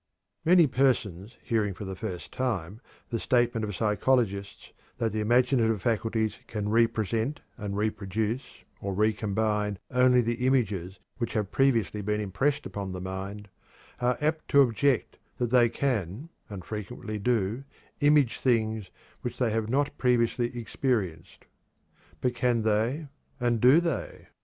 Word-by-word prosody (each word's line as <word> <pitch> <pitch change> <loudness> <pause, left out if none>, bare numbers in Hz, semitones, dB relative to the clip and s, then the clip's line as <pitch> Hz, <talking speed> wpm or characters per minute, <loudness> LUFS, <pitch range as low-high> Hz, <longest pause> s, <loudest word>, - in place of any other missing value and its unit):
Many 175 0 +6
persons 120 - 0
hearing 105 -5 0
for 105 - -7
the 95 0 -5
first 90 -3 -6
time 110 -5 -2 0.3
the 115 - -1
statement 120 -2 +1
of 105 -2 -3
psychologists 105 -2 0 0.3
that 115 -2 0
the 110 - -2
imaginative 120 -1 +3
faculties 110 0 -1
can 105 -2 -3
re 115 +1 +5
present 115 +5 -2 0.2
and 100 -1 -4
re 105 +1 +1
produce 110 +6 -4 0.2
or 100 -1 -3
re 110 +2 +3
combine 105 -1 -1
only 125 0 +5
the 120 +2 -1
images 100 -8 0 0.2
which 120 - -2
have 105 -4 -1
previously 115 -6 +2
been 105 +1 -1
impressed 130 +9 0
upon 100 -2 -5
the 90 - -5
mind, 95 +3 -6 0.5
are 125 0 +1
apt 155 +1 0
to 140 -1 +6
object 125 +1 0 0.2
that 120 -2 -1
they 120 -2 +5
can, 120 - -2 0.2
and 95 -4 -8
frequently 105 0 -5
do, 115 +2 0 0.4
image 145 -4 +4
things 110 -5 +1 0.3
which 125 - -5
they 120 -3 +1
have 110 0 -1
not 140 +3 +1
previously 120 -1 +2
experienced. 110 -7 -2 0.8
But 125 -1 +1
can 120 -1 +1
they 110 +8 +1 0.3
and 120 -2 +1
do 130 +6 +7
they? 170 -4 -4
115 Hz, 145 wpm, -28 LUFS, 105-125 Hz, 0.8 s, do